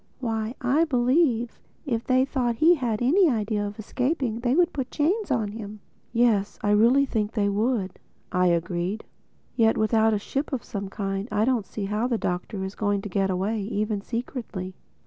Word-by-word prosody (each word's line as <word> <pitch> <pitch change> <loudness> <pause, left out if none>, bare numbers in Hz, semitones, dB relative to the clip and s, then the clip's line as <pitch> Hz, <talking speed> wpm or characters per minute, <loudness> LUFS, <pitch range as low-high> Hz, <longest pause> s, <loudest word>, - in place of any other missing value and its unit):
Why, 225 -1 -2
I 275 +6 +3
believe 250 -3 +1 0.3
if 235 -5 -1
they 255 +1 +3
thought 250 -4 -1
he 320 +8 +5
had 245 -7 -1
any 340 +7 +5
idea 210 -3 -1
of 205 - -8
escaping 250 +1 -1
they 245 +2 +1
would 350 +1 +3
put 265 -3 -3
chains 370 - 0
on 225 -6 0
him." 210 0 -8 0.3
"Yes, 230 -4 +2
I 205 - +2
really 235 +7 +5
think 220 -4 -2
they 205 -3 +1
would," 205 -2 -1 0.3
I 180 0 +3
agreed. 175 +4 -1 0.5
"Yet 225 -2 +3
without 220 0 +3
a - - +1
ship 275 +8 -3
of 255 - -2
some 200 -2 -5
kind 195 +1 -3
I 210 +1 +2
don't 240 -6 0
see 205 +1 -4
how 210 +4 -1
the 240 -2 0
Doctor 185 +1 -3
is 190 +1 -5
going 205 -2 -1
to 210 - -5
get 195 +1 0
away, 195 +4 -1
even 210 0 -2
secretly." 225 -5 -5
225 Hz, 185 wpm, -25 LUFS, 205-255 Hz, 0.5 s, he